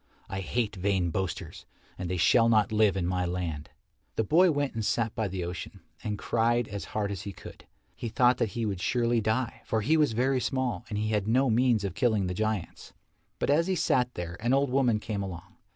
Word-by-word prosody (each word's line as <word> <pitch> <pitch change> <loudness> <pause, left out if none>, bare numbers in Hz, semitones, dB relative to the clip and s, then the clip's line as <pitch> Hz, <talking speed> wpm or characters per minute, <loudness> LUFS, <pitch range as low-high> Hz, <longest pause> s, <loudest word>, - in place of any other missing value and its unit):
I 95 - -3
hate 110 +3 -1
vain 95 -2 0
boasters, 95 0 -4 0.3
and 90 -2 -5
they 90 - -1
shall 115 +8 +4
not 110 -3 +3
live 105 -3 +3
in 90 - 0
my 90 0 0
land." 85 -4 -3 0.5
The 110 - +1
boy 175 - +5
went 145 -3 0
and 110 -1 -3
sat 115 +1 0
by 110 - -1
the 95 -1 -4
ocean, 90 +1 -6 0.2
and 105 -1 -2
cried 120 +2 +1
as 100 -1 -5
hard 100 -1 0
as 100 - -4
he 100 -1 -6
could. - - -12 0.3
He 115 - -5
thought 125 +2 +3
that 115 - +1
he 115 - 0
would 100 -4 -3
surely 120 0 +1
die, 110 +3 -1
for 110 - -1
he 155 +9 +3
was 150 -7 +3
very 130 +3 +2
small 130 -3 -1
and 105 - -3
he 110 +1 -1
had 105 -2 0
no 130 +2 +3
means 120 -2 +3
of 95 -3 -2
killing 110 -1 +1
the 90 - -2
giants. 110 -2 -3 0.4
But - - 0
as 165 +4 +3
he 190 - +1
sat 125 -6 +1
there 85 -1 -5
an 120 +4 +2
old 140 -1 +1
woman 125 -5 +2
came 105 -2 -4
along. 95 +1 -8
110 Hz, 220 wpm, -28 LUFS, 95-120 Hz, 0.5 s, boy